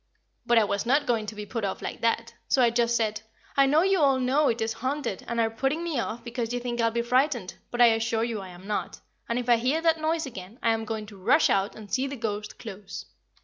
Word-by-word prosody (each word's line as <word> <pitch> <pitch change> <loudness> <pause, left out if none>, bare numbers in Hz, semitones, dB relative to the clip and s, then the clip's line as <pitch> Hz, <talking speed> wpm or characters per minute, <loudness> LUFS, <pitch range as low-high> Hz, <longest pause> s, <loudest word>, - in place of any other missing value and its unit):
But 240 - +4
I 225 - +6
was 200 +2 -1
not 280 +4 +3
going 225 -3 0
to 215 - -6
be 210 0 -6
put 225 +1 -4
off 195 - -2
like - - -5
that, 230 0 0
so 260 - +3
I 235 - +4
just 235 0 +2
said, 215 -2 0 0.3
"I 275 -1 +5
know 305 +4 +4
you 385 -1 +3
all 275 -3 +4
know 270 +4 +3
it 230 - +1
is 225 0 -1
haunted 260 -5 -3
and 235 0 -2
are 225 -1 +2
putting 270 +8 -1
me 330 -7 -1
off 230 0 -4
because 235 -1 -3
you 245 - -1
think 240 -1 -2
I'll 230 - +3
be 235 +1 -1
frightened; 250 -4 +1 0.2
but 245 - -1
I 235 -2 +8
assure 225 0 0
you 230 -3 -2
I 190 - -9
am 180 +1 -12
not, 210 0 -3 0.3
and 235 - 0
if 245 -1 -3
I 240 -1 +6
hear 255 +7 +1
the 325 0 +4
noise 320 +1 -1
again 200 -3 -9
I 230 - +4
am 225 0 -1
going 220 -1 -4
to 205 -1 -12
rush - - +4
out 195 +2 +1
and 210 -2 -11
see 265 +1 +1
the 280 - -5
ghost 210 -3 -4
close." 200 -2 -8
235 Hz, 265 wpm, -27 LUFS, 220-260 Hz, 0.3 s, I